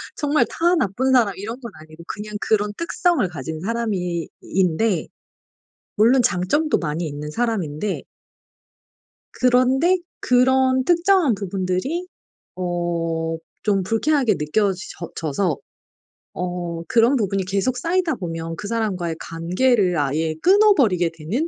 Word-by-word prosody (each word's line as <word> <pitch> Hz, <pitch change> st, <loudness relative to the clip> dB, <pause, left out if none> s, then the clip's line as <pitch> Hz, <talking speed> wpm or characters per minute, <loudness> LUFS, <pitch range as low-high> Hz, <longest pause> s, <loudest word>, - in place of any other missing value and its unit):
정말 295 Hz, 0 st, +2 dB
다 345 Hz, +2 st, +2 dB
나쁜 260 Hz, -, 0 dB
사람 225 Hz, -7 st, +3 dB
이런 225 Hz, +6 st, -6 dB
건 235 Hz, -5 st, -9 dB
아니고 155 Hz, +1 st, -13 dB
그냥 210 Hz, 0 st, -6 dB
그런 210 Hz, -1 st, +1 dB
특성을 335 Hz, -, +1 dB
가진 155 Hz, -1 st, -6 dB
사람이 190 Hz, -5 st, -2 dB
인데 185 Hz, 0 st, 0 dB, 0.9 s
물론 240 Hz, +4 st, +5 dB
장점도 210 Hz, -, +1 dB
많이 160 Hz, +1 st, -3 dB
있는 150 Hz, +1 st, -6 dB
사람인데 200 Hz, -4 st, -2 dB, 1.3 s
그런데 255 Hz, +8 st, +3 dB, 0.2 s
그런 260 Hz, +1 st, +3 dB
특정한 345 Hz, -, +3 dB
부분들이 195 Hz, -, -2 dB, 0.5 s
어 170 Hz, -2 st, -2 dB, 0.3 s
좀 200 Hz, -3 st, +2 dB
불쾌하게 230 Hz, +1 st, +1 dB
느껴져 190 Hz, +6 st, +1 dB, 0.4 s
져서 160 Hz, +1 st, -1 dB, 0.8 s
어 175 Hz, -2 st, -4 dB
그런 235 Hz, +4 st, +4 dB
부분이 195 Hz, -4 st, 0 dB
계속 200 Hz, +7 st, 0 dB
쌓이다 335 Hz, +3 st, 0 dB
보면 165 Hz, -2 st, -5 dB
그 205 Hz, -, -6 dB
사람과의 190 Hz, -8 st, -2 dB
관계를 180 Hz, +3 st, +1 dB
아예 155 Hz, +3 st, 0 dB
끊어버리게 295 Hz, -, +4 dB
되는 220 Hz, -, -2 dB
200 Hz, 260 characters per minute, -22 LUFS, 170-255 Hz, 1.3 s, 물론